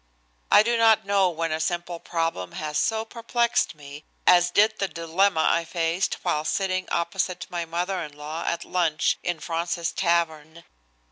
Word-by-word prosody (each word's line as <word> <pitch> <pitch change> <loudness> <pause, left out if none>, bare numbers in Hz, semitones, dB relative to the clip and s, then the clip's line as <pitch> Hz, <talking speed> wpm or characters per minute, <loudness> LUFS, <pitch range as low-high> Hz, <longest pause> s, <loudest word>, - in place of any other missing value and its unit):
I 210 - +8
do 235 +1 +1
not 225 -3 +4
know 200 -2 +3
when 165 -1 -3
a 155 - -1
simple 175 +1 -2
problem 165 - -3
has 150 -1 -2
so 220 0 0
perplexed 235 -1 0
me 145 0 -11 0.2
as 175 0 +6
did 215 +4 +3
the 195 - +1
dilemma 170 +1 +1
I 170 - +2
faced 165 +2 -1
while 150 - 0
sitting 185 +2 -1
opposite 180 0 -2
my 170 -1 -3
mother 175 +3 -2
in 150 -2 -8
law 150 +2 -5
at 170 0 -2
lunch 170 -4 +1
in 175 -2 -2
Fraunces's 170 +1 -2
Tavern. 170 -2 -1
170 Hz, 160 wpm, -25 LUFS, 165-195 Hz, 0.2 s, I